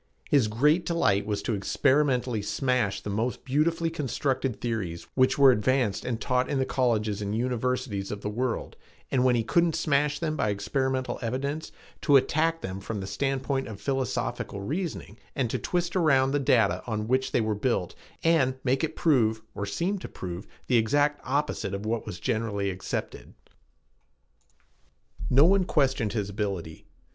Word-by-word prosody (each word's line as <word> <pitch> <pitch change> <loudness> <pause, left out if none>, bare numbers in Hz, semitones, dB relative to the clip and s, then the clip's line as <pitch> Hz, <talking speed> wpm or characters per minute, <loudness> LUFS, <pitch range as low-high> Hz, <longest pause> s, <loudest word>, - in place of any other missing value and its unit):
His 140 -7 +4
great 150 +11 +3
delight 105 - +1
was 100 -1 -2
to 115 - -1
experimentally 130 +2 +1
smash 105 0 0
the 105 - -5
most 115 +5 -2
beautifully 165 +5 +1
constructed 135 -4 -1
theories 100 -8 -3
which 130 0 +3
were 140 -2 +8
advanced 120 -1 +1
and 120 -3 -2
taught 125 0 0
in 140 - 0
the 130 - +1
colleges 110 -6 0
and 100 +1 -2
universities 125 -3 -1
of 105 -1 -5
the - - -4
world, 120 +2 -2 0.4
and 125 -2 +2
when 125 -1 +4
he 115 - +1
couldn't 170 +6 +2
smash 150 -2 +1
them 155 -2 -2
by 105 - 0
experimental 130 +6 -1
evidence, 140 +6 -3 0.3
to 145 - +4
attack 165 +4 +1
them 95 +1 -5
from 105 +2 -5
the 95 - -4
standpoint 135 +5 -1
of 105 -3 -8
philosophical 135 -6 -2
reasoning 145 - -4 0.2
and 125 -5 0
to - - -1
twist 175 0 -1
around 135 -7 +3
the 145 - +1
data 125 -7 +3
on 110 -2 -2
which 130 +2 +1
they - - +2
were 110 -1 0
built 105 -4 -1 0.3
and 160 -6 +3
make 135 +2 +1
it 160 0 -2
prove, 110 -8 +2
or 100 - -4
seem 185 - -1
to - - -7
prove, 90 +1 -7 0.2
the 125 - +3
exact 145 +6 +2
opposite 130 -7 -1
of 100 +2 -6
what 115 +1 -2
was 85 - -6
generally 100 -3 -1
accepted. 95 0 -5 1.9
No 135 +4 +6
one 195 +2 +4
questioned 135 - +1
his 105 -4 -1
ability. 100 -6 -4
125 Hz, 165 wpm, -27 LUFS, 105-140 Hz, 1.9 s, were